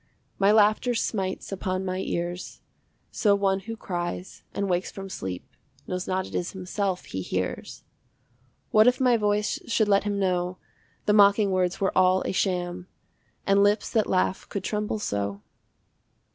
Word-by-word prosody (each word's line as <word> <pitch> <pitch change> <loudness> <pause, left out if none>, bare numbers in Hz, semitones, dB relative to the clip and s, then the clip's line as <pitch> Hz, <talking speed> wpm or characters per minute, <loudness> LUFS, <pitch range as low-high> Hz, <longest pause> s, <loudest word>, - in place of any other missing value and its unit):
My 200 +1 +5
laughter 215 +3 +4
smites 195 -5 -2
upon 185 -1 -2
my 185 0 -2
ears, 175 -1 -4 0.5
So 205 -2 +3
one 195 -1 +1
who 225 +4 -7
cries 175 -1 -5
and 200 - -2
wakes 180 0 0
from 195 0 -8
sleep 95 - -5 0.4
Knows 180 0 -4
not 185 0 0
it - - -11
is 175 - -2
himself 190 0 -2
he 95 - -5
hears. 90 0 -4 0.9
What 215 +2 +6
if 250 +1 +4
my 250 -2 +4
voice 210 -1 +1
should 225 -2 +2
let 200 -1 +4
him 205 -1 -1
know 180 -2 0 0.5
The 210 - +3
mocking 200 0 +5
words 185 -1 0
were 195 - 0
all 185 0 +4
a - - -1
sham, 180 -2 -1 0.6
And 200 0 +4
lips 205 +1 +2
that 220 -3 +2
laugh 185 0 0
could 200 - -4
tremble 210 +2 -2
so? 100 - -3
190 Hz, 160 wpm, -26 LUFS, 180-205 Hz, 0.9 s, What